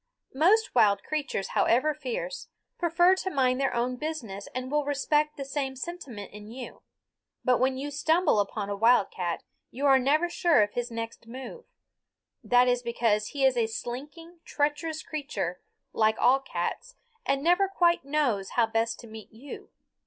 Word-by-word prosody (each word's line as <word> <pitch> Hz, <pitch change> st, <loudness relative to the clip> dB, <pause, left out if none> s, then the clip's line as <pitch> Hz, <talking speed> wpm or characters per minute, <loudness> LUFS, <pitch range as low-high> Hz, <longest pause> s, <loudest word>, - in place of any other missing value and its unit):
Most 380 Hz, +11 st, +3 dB
wild 210 Hz, -5 st, +4 dB
creatures, 300 Hz, -10 st, -3 dB
however 260 Hz, +7 st, +2 dB
fierce, -, -, -5 dB, 0.3 s
prefer 350 Hz, +1 st, +4 dB
to 380 Hz, -, -2 dB
mind 260 Hz, -5 st, +1 dB
their 270 Hz, -, +1 dB
own 250 Hz, +1 st, -1 dB
business 245 Hz, -10 st, -5 dB
and 255 Hz, +1 st, -4 dB
will 295 Hz, 0 st, +2 dB
respect 295 Hz, +1 st, 0 dB
the 275 Hz, -, -5 dB
same 270 Hz, -1 st, -3 dB
sentiment 260 Hz, -, -7 dB
in 210 Hz, 0 st, -10 dB
you. 245 Hz, +1 st, -9 dB, 0.6 s
But 250 Hz, -1 st, +3 dB
when 260 Hz, +1 st, +1 dB
you 285 Hz, +2 st, -4 dB
stumble 315 Hz, -, +2 dB
upon 205 Hz, 0 st, -2 dB
a -, -, -1 dB
wildcat 200 Hz, -6 st, +2 dB, 0.3 s
you 275 Hz, +4 st, -4 dB
are 270 Hz, -1 st, +6 dB
never 300 Hz, +7 st, +2 dB
sure 340 Hz, -8 st, +3 dB
of 205 Hz, -, -3 dB
his 245 Hz, 0 st, -2 dB
next 230 Hz, 0 st, -6 dB
move. 265 Hz, -, -9 dB, 0.8 s
That 245 Hz, +1 st, +4 dB
is 245 Hz, 0 st, +2 dB
because 230 Hz, -3 st, 0 dB
he 275 Hz, -2 st, 0 dB
is 260 Hz, -1 st, +4 dB
a 230 Hz, -2 st, +1 dB
slinking, 295 Hz, +10 st, -7 dB
treacherous 305 Hz, +2 st, -2 dB
creature, 280 Hz, -, -4 dB, 0.3 s
like 220 Hz, 0 st, +2 dB
all 260 Hz, +2 st, +4 dB
cats, -, -, -4 dB, 0.3 s
and 275 Hz, 0 st, 0 dB
never 355 Hz, +4 st, +4 dB
quite 345 Hz, -4 st, +2 dB
knows 270 Hz, -9 st, 0 dB
how 235 Hz, -, +5 dB
best 225 Hz, +1 st, -1 dB
to 235 Hz, -, -12 dB
meet 220 Hz, -1 st, -11 dB
you. 255 Hz, +6 st, -10 dB
265 Hz, 165 wpm, -27 LUFS, 230-310 Hz, 0.8 s, are